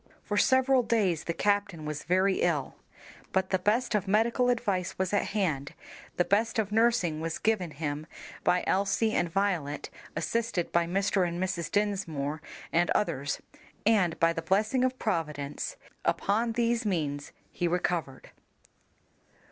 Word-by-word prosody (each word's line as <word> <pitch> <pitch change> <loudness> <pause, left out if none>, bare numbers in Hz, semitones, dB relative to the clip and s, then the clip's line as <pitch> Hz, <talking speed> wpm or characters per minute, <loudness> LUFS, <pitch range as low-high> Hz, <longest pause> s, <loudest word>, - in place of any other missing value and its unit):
For 205 - -3
several 260 +3 +4
days 205 -9 +1
the 170 - -1
captain 200 -5 0
was 150 -1 -4
very 185 +2 +3
ill, 150 -6 0 0.6
but 190 0 0
the 190 - +2
best 225 +6 +1
of 205 -2 0
medical 230 +5 +3
advice 205 -7 0
was 190 +1 -1
at 205 - +2
hand, 160 -10 -1 0.4
the 175 - +3
best 220 +4 +1
of 210 -2 0
nursing 215 -8 +2
was 165 0 -2
given 215 -6 +1
him 150 0 -4 0.4
by 180 - +3
Elsie 200 +3 +1
and 175 -5 +1
Violet, 170 -6 -1 0.2
assisted 230 -7 -1
by 170 0 +2
Mr. 190 0 +1
and 170 0 -4
Mrs. 180 -3 -2
Dinsmore 165 -8 -1 0.3
and 175 +1 +3
others, 145 -8 -1 0.4
and, 195 -7 +3
by 165 0 +4
the 165 - -3
blessing 215 +8 +1
of 255 0 +1
Providence, 150 - -2 0.3
upon 225 +3 +1
these 235 0 +1
means 150 -8 -2 0.2
he 175 - -1
recovered. 170 -6 -2
190 Hz, 145 wpm, -29 LUFS, 165-215 Hz, 0.6 s, several